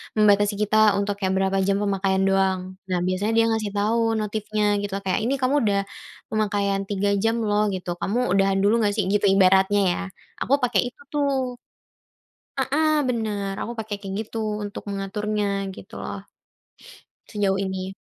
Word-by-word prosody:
membatasi 205 -1 +4
kita 210 +1 +2 0.2
untuk 200 0 -1
kayak 190 -2 0
berapa 195 0 +1
jam 200 +1 +1
pemakaian 195 -1 +1
doang, 190 -1 +2 0.2
nah 180 -2 -1
biasanya 185 +5 0
dia 230 0 +4
ngasih 215 -2 -1
tahu 225 +2 +1
notifnya 210 -1 0
gitu 200 -1 -4
kayak 195 +3 -1
ini 270 +2 -1
kamu 260 +3 +2
udah, 200 -1 +2 0.5
pemakaian 205 -2 0
3 200 0 -1
jam 225 +3 +1
loh 210 0 +2
gitu, 175 -2 -4
kamu 240 +8 -1
udahan 195 +1 +2
dulu 210 +4 +3
nggak 210 -3 +1
sih, 200 -3 -1
gitu 205 +1 +2
ibaratnya 195 +1 +4
ya - - -2 0.4
aku 270 - 0
pakai 250 -1 +2
itu - - -23
tuh. 270 -4 0 1.0
Heeh, 310 +3 +2 0.2
bener 210 -4 -2
aku 235 - -4
pakai 215 -1 -4
kayak 195 -1 -6
gitu 225 +1 -8 0.3
untuk 205 - -6
mengaturnya 205 +1 -2 0.3
gitu - - -13
loh. - - -6 1.1
Sejauh 200 -3 0
ini. 190 0 -3
205 Hz, 160 wpm, -24 LUFS, 195-220 Hz, 1.1 s, membatasi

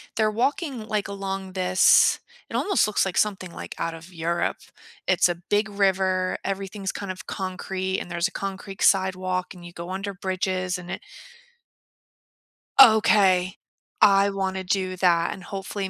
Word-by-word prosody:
they're 215 -1 +2
walking, 250 +1 -2
like, 210 -2 -1
along 195 -1 -5
this 185 0 +4 0.3
it - - -6
almost 395 - +2
looks 215 - +1
like 190 - -3
something, 190 -4 0
like, - - -8
out 165 0 -2
of 165 +3 -12
Europe. 170 +1 -1 0.5
It's - - +4
a 175 - -1
big 205 +5 -1
river. 190 -2 +1
Everything's 195 0 -4
kind 200 -2 -5
of 185 - -9
concrete, 190 0 -3
and 175 - -8
there's 170 +2 0
a - - -11
concrete 195 0 -6
sidewalk, 185 -1 +1
and 175 -2 -13
you 175 - -9
go 170 +1 -8
under 195 +2 -4
bridges, 185 -1 -2
and 175 -1 -9
it 190 - -5 1.8
Okay, 205 -6 +5 0.5
I 200 -1 +6
wanna 190 -1 -2
do 185 0 -1
that. 170 -2 +2
And, 190 - -11
hopefully, 195 +1 -5
190 Hz, 155 wpm, -24 LUFS, 185-200 Hz, 1.8 s, I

